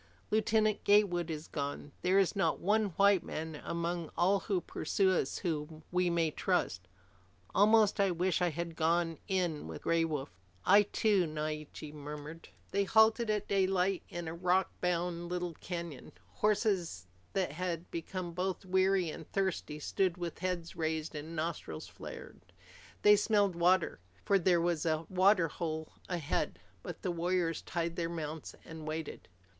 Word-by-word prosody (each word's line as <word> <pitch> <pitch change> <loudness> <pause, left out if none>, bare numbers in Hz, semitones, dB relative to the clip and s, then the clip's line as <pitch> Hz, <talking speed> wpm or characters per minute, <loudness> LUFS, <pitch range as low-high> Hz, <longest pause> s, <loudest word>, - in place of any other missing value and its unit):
Lieutenant 215 0 +2
Gatewood 190 -5 +3
is 155 -1 -5
gone. 145 0 -4
There 185 +2 +3
is 195 +1 +3
not 195 - +1
one 215 +3 +2
white 200 -2 +5
man 160 -1 -5
among 170 0 -2
all 190 +3 +4
who 195 -3 0
pursue 190 +3 0
us 185 - 0
whom 155 -3 -3
we 180 0 +2
may 165 -2 +1
trust. 90 - -1 0.7
Almost 215 0 +5
I 200 -1 +4
wish 180 0 +1
that 180 - +2
I - - +2
had 170 0 -4
gone 165 0 +1
in 180 - -1
with 80 - -7
Chief - - -25
Gray 165 0 +2
Wolf." 150 -4 -3 0.3
"I 200 +2 +7
too," 205 -3 +2
Naiche 155 -1 -5
murmured. 150 +2 -8 0.2
They 200 +1 +2
halted 220 +2 +4
at 210 -1 0
daylight 190 -1 +2
in 175 -1 -5
a 160 - -4
rockbound 180 -1 0
little 180 -1 -2
canyon. 170 -4 -6 0.2
Horses 190 - 0 0.3
that 190 -6 0
had 175 +1 -4
become 175 +1 -4
both 185 +2 -2
weary 185 -2 +2
and 160 - -10
thirsty 190 -6 -1
stood 180 +4 0
with 175 -2 -5
heads 180 -2 -3
raised 160 0 -2
and 155 +2 -6
nostrils 155 - -4
flared. - - -10 0.6
They 210 0 +8
smelled 205 -3 +2
water, 175 - +3 0.3
for 195 - +4
there 175 -1 +3
was 170 -2 0
a 160 -1 0
water 185 -1 +4
hole 160 -1 -4 0.2
ahead. 160 - -1 0.2
But - - -8
the 185 - 0
warriors 170 -1 0
tied 170 0 -2
their 165 -1 -1
mounts 160 -2 -5
and 160 -2 -8
waited. 155 0 -5
175 Hz, 155 wpm, -32 LUFS, 160-190 Hz, 0.7 s, They